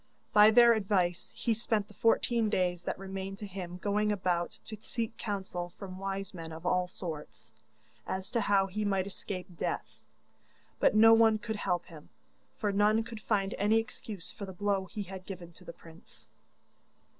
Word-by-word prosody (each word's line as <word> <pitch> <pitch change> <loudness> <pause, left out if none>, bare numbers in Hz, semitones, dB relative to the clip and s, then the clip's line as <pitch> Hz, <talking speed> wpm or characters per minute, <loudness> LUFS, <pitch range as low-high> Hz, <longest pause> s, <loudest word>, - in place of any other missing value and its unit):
By 210 0 +9
their 235 +1 +7
advice 190 -5 0
he 230 - +1
spent 220 -2 -1
the 210 - -16
fourteen 230 +1 +2
days 180 -3 +1
that - - -3
remained 195 0 -5
to 210 - -6
him 180 -2 -6
going 210 +2 +1
about 180 -4 -1
to 220 - -6
seek 225 -1 -3
counsel 190 -4 -4
from 185 -2 -8
wise 195 0 -4
men 165 -2 -7
of 160 +2 -9
all 180 0 +2
sorts, 150 -10 -8 0.5
as 190 +1 -4
to 230 - +1
how 200 -2 +3
he 205 +3 -3
might 195 -2 +1
escape 185 -2 -7
death, - - -3 0.8
but - - +4
no 225 +1 +8
one 225 -1 +6
could 220 -1 -4
help 175 -4 -1
him, 155 -3 -13 0.5
for 205 - 0
none 210 +3 +3
could 225 -1 -9
find 200 -3 0
any 210 +3 +4
excuse 220 -4 -5
for 200 - -7
the 190 - -7
blow 195 0 0
he 210 +2 -5
had 190 -1 -9
given 175 -3 -8
to 180 - -16
the 170 - -8
prince. 165 0 -16
195 Hz, 180 wpm, -31 LUFS, 180-215 Hz, 0.8 s, By